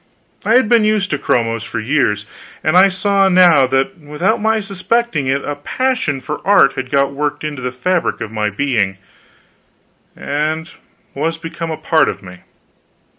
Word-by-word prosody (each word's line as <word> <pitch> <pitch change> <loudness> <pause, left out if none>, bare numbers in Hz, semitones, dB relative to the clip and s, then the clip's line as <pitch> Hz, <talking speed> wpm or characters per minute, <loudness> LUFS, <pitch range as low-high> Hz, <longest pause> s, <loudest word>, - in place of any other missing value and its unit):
I 225 - +2
had 255 -3 +4
been 230 -1 +4
used 215 -2 +1
to 145 - -1
chromos 115 -2 0
for - - -5
years, 110 -4 0 0.4
and 155 +2 +1
I 190 +2 +7
saw 195 0 +1
now 175 -7 +5
that 135 +8 -1
without 155 +9 -1
my 220 +1 +2
suspecting 200 - -1
it 135 +1 -1
a 145 - -3
passion 250 - -1
for 150 +3 -6
art 190 -7 +5
had 130 -1 -5
got 140 0 +1
worked 145 +1 -3
into 150 -3 -5
the 125 0 -3
fabric 170 +8 -1
of 110 -2 -6
my 105 -1 -1
being, 105 -4 -1 1.2
and 155 +3 -3 0.4
was 160 +4 -2
become 165 0 -6
a 160 - -3
part 160 0 +2
of - - -6
me. 90 -1 -11
155 Hz, 170 wpm, -17 LUFS, 135-190 Hz, 1.2 s, I